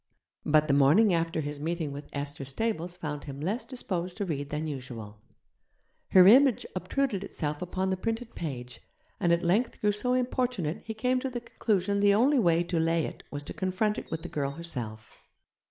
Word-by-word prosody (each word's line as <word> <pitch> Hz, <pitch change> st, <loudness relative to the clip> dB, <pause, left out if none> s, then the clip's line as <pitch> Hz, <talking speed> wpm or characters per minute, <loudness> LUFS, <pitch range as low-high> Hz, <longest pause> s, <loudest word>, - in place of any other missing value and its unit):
But 155 Hz, 0 st, +4 dB
the 140 Hz, -, +3 dB
morning 155 Hz, +10 st, +5 dB
after 165 Hz, -1 st, 0 dB
his 145 Hz, 0 st, -5 dB
meeting 160 Hz, -1 st, -2 dB
with 145 Hz, +1 st, -8 dB
Esther 145 Hz, 0 st, -4 dB
Stables 175 Hz, -, -2 dB
found 150 Hz, -2 st, -5 dB
him 140 Hz, -2 st, -7 dB
less 210 Hz, -, -2 dB
disposed 185 Hz, -8 st, -3 dB
to 205 Hz, -, -1 dB
read 145 Hz, -5 st, -3 dB
than 150 Hz, +1 st, -2 dB
usual. 120 Hz, -8 st, -7 dB, 0.9 s
Her 185 Hz, -1 st, +8 dB
image 255 Hz, +4 st, +6 dB
obtruded 200 Hz, -, -1 dB
itself 150 Hz, -6 st, -4 dB
upon 185 Hz, +1 st, -1 dB
the 190 Hz, -, 0 dB
printed 225 Hz, +4 st, -3 dB
page, 125 Hz, -6 st, -6 dB, 0.4 s
and 175 Hz, -4 st, +2 dB
at 170 Hz, +1 st, +2 dB
length 210 Hz, +8 st, +1 dB
grew 210 Hz, -, +2 dB
so 250 Hz, +5 st, 0 dB
importunate 250 Hz, -, -1 dB
he 220 Hz, -, -5 dB
came 250 Hz, +3 st, +1 dB
to 265 Hz, -, -3 dB
the 240 Hz, -1 st, -5 dB
conclusion 200 Hz, -4 st, 0 dB
the 200 Hz, 0 st, +5 dB
only 265 Hz, +6 st, +4 dB
way 170 Hz, -5 st, +3 dB
to 170 Hz, -1 st, -1 dB
lay 165 Hz, 0 st, +2 dB
it -, -, -7 dB
was 145 Hz, 0 st, -5 dB
to -, -, -7 dB
confront 190 Hz, +3 st, 0 dB
it -, -, -11 dB
with 160 Hz, 0 st, -4 dB
the -, -, -5 dB
girl 140 Hz, -2 st, -2 dB
herself. 125 Hz, -9 st, -6 dB
175 Hz, 190 wpm, -29 LUFS, 150-215 Hz, 0.9 s, Her